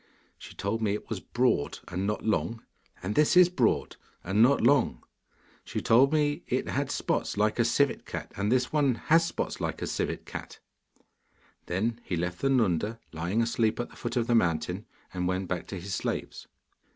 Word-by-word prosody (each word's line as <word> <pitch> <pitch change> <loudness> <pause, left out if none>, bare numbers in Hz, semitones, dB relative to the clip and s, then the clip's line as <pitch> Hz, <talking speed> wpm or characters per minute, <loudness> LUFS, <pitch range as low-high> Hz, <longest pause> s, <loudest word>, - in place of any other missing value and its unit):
She - - -11
told 105 +3 -2
me 105 -2 +1
it 105 - -6
was 110 - -2
broad 120 - 0
and 95 +3 -2
not 105 - -2
long, 115 +1 -1 0.4
and 95 +3 -2
this 150 - +4
is 180 -1 +8
broad 130 -10 +1 0.3
and 95 +4 +1
not 135 +4 +5
long. 120 - +3 0.6
She - - -4
told 130 +5 +5
me 150 -1 +1
it - - -1
had - - -1
spots - - -1
like 105 +2 +1
a - - +5
civet 140 +4 +1
cat, - - -6
and 100 +2 -1
this 125 0 +3
has 150 +3 +3
spots 165 - -3
like - - -2
a - - -3
civet - - -3
cat.' - - -8 1.1
Then 115 +6 -1
he 90 - -3
left 90 +1 -3
the 135 - +1
Nunda 110 -3 +1
lying 85 +8 0
asleep 115 -1 0
at 120 - -3
the - - -15
foot 120 -1 -4
of 120 -2 +1
the 120 - +1
mountain, 90 -1 +1 0.3
and 90 -1 -1
went 95 +1 -1
back 90 0 -3
to 95 - -5
his 95 +2 -6
slaves. - - -3
110 Hz, 190 wpm, -28 LUFS, 95-125 Hz, 1.1 s, is